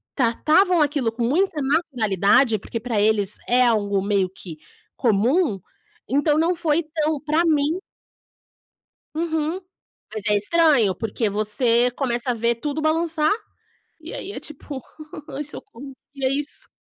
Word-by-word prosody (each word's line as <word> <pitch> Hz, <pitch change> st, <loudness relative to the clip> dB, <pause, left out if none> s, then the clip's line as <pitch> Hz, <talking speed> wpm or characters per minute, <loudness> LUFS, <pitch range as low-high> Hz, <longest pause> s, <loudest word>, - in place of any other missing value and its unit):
tratavam 310 Hz, +8 st, +3 dB
aquilo 285 Hz, -5 st, +1 dB
com 235 Hz, +1 st, -4 dB
muita 320 Hz, +5 st, +1 dB
naturalidade, 245 Hz, -, +2 dB
porque 230 Hz, +4 st, -5 dB
pra 230 Hz, -2 st, -2 dB
eles 210 Hz, -1 st, +1 dB
é 250 Hz, +1 st, +4 dB
algo 205 Hz, -4 st, +1 dB
meio 200 Hz, -1 st, +1 dB
que 180 Hz, -3 st, -10 dB, 0.4 s
comum, 235 Hz, -, +1 dB, 0.5 s
então 290 Hz, +4 st, +2 dB
não 340 Hz, +2 st, +2 dB
foi 325 Hz, -1 st, +1 dB
tão 310 Hz, -1 st, -2 dB
pra 310 Hz, +3 st, +1 dB
mim 310 Hz, +1 st, +1 dB, 1.4 s
Uhum, 320 Hz, +1 st, -1 dB, 0.5 s
mas 215 Hz, -2 st, -5 dB
é 210 Hz, -, +3 dB
estranho 255 Hz, -, +3 dB
porque 220 Hz, +2 st, -2 dB
você 230 Hz, +4 st, +2 dB
começa 245 Hz, -1 st, -1 dB
a -, -, 0 dB
ver 235 Hz, +1 st, 0 dB
tudo 295 Hz, +5 st, -4 dB
balançar, 315 Hz, +1 st, +1 dB, 0.7 s
e -, -, -9 dB
aí 450 Hz, -6 st, -6 dB
é -, -, -6 dB
tipo: 285 Hz, -2 st, -8 dB, 0.5 s
"Aí 280 Hz, +1 st, -4 dB
socorro, 275 Hz, -2 st, -10 dB, 0.2 s
que 275 Hz, -2 st, -8 dB
é -, -, +3 dB
isso?". 290 Hz, +1 st, -1 dB
270 Hz, 140 wpm, -22 LUFS, 220-310 Hz, 1.4 s, é